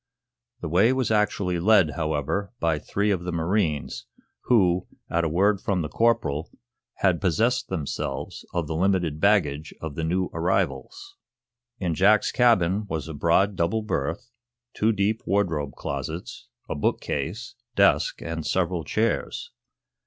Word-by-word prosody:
The -, -, -3 dB
way 95 Hz, +9 st, +4 dB
was 130 Hz, -3 st, 0 dB
actually 100 Hz, -4 st, +1 dB
led, 95 Hz, -4 st, +4 dB
however, 80 Hz, +5 st, -2 dB
by 80 Hz, -2 st, +1 dB
three 100 Hz, +7 st, -1 dB
of 90 Hz, -3 st, -1 dB
the 90 Hz, -, -3 dB
marines, 85 Hz, -2 st, -1 dB, 0.4 s
who, 95 Hz, -7 st, +3 dB, 0.2 s
at 85 Hz, 0 st, +1 dB
a 80 Hz, -, +1 dB
word 100 Hz, +5 st, +2 dB
from 95 Hz, -4 st, 0 dB
the 75 Hz, -, -4 dB
corporal, 115 Hz, -11 st, +1 dB, 0.6 s
had 90 Hz, -3 st, +3 dB
possessed 110 Hz, +8 st, +1 dB
themselves 80 Hz, -7 st, -4 dB
of 85 Hz, -2 st, -1 dB
the 80 Hz, -, -4 dB
limited 85 Hz, -3 st, +1 dB
baggage 80 Hz, -7 st, +1 dB
of 80 Hz, -2 st, -5 dB
the 80 Hz, -, -4 dB
new 90 Hz, +3 st, 0 dB
arrivals. 100 Hz, -, -2 dB, 0.6 s
In 90 Hz, -4 st, -1 dB
Jack's 105 Hz, +6 st, +4 dB
cabin 105 Hz, -5 st, +3 dB
was 80 Hz, -2 st, -4 dB
a 80 Hz, -, -6 dB
broad 85 Hz, +6 st, +2 dB
double 90 Hz, +6 st, 0 dB
berth, 85 Hz, -, -3 dB, 0.4 s
two 110 Hz, +2 st, +2 dB
deep 105 Hz, +1 st, 0 dB
wardrobe 80 Hz, -8 st, 0 dB
closets, -, -, -6 dB, 0.2 s
a -, -, -2 dB
book 70 Hz, -, 0 dB
case, -, -, -4 dB, 0.2 s
desk -, -, +3 dB
and 80 Hz, -1 st, -4 dB
several 90 Hz, -1 st, 0 dB
chairs. 110 Hz, +9 st, -1 dB
90 Hz, 145 wpm, -25 LUFS, 80-105 Hz, 0.6 s, way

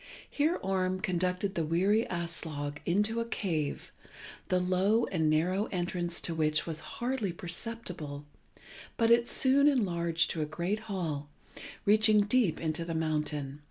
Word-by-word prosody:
Here 305 Hz, +4 st, +1 dB
Orm 185 Hz, -1 st, 0 dB
conducted 185 Hz, 0 st, -1 dB
the 170 Hz, -, -1 dB
weary 190 Hz, +8 st, +2 dB
Aslog 160 Hz, -4 st, -4 dB
into 210 Hz, +6 st, +1 dB
a 230 Hz, -, -2 dB
cave, 160 Hz, -10 st, -2 dB, 0.6 s
the 185 Hz, -, +2 dB
low 190 Hz, +5 st, +2 dB
and 160 Hz, -4 st, 0 dB
narrow 180 Hz, +7 st, +1 dB
entrance 175 Hz, -1 st, -2 dB
to 170 Hz, -, -1 dB
which 155 Hz, -1 st, +1 dB
was 160 Hz, -2 st, -3 dB, 0.2 s
hardly 240 Hz, -5 st, -1 dB
perceptible, 170 Hz, -5 st, -3 dB, 0.7 s
but 230 Hz, -1 st, +3 dB
it 235 Hz, 0 st, +5 dB
soon 275 Hz, +2 st, +4 dB
enlarged 170 Hz, -, +2 dB
to 160 Hz, -, -2 dB
a 150 Hz, -, -1 dB
great 175 Hz, +7 st, -2 dB
hall, 155 Hz, -7 st, -3 dB, 0.6 s
reaching 215 Hz, 0 st, +5 dB
deep 205 Hz, -4 st, +2 dB
into 160 Hz, 0 st, -2 dB
the 165 Hz, -1 st, -4 dB
mountain. 150 Hz, -3 st, -2 dB
180 Hz, 140 wpm, -30 LUFS, 160-210 Hz, 0.7 s, it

